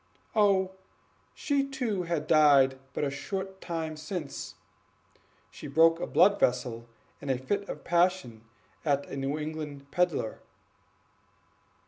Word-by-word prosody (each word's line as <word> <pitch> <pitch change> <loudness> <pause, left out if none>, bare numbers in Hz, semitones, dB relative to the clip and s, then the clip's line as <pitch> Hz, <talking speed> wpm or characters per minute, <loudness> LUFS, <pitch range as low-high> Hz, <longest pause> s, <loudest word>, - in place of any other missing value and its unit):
"Oh, 195 -3 +3 0.6
she 285 -2 +1
too 250 -8 -2
had 160 -3 -1
died 140 -4 +5
but - - -3
a 140 - 0
short 190 +6 -5
time 160 -2 -4
since; 155 -1 -6 1.0
she - - -9
broke 165 +3 +4
a - - -3
blood 200 +4 +4
vessel 120 -2 0 0.3
in 140 - -6
a 130 - +2
fit 200 +11 -3
of - - -6
passion 175 -9 +1 0.4
at 140 -2 +1
a - - -6
New 135 +2 -2
England 150 -2 -6
peddler." 175 -11 0
155 Hz, 125 wpm, -29 LUFS, 140-190 Hz, 1.0 s, died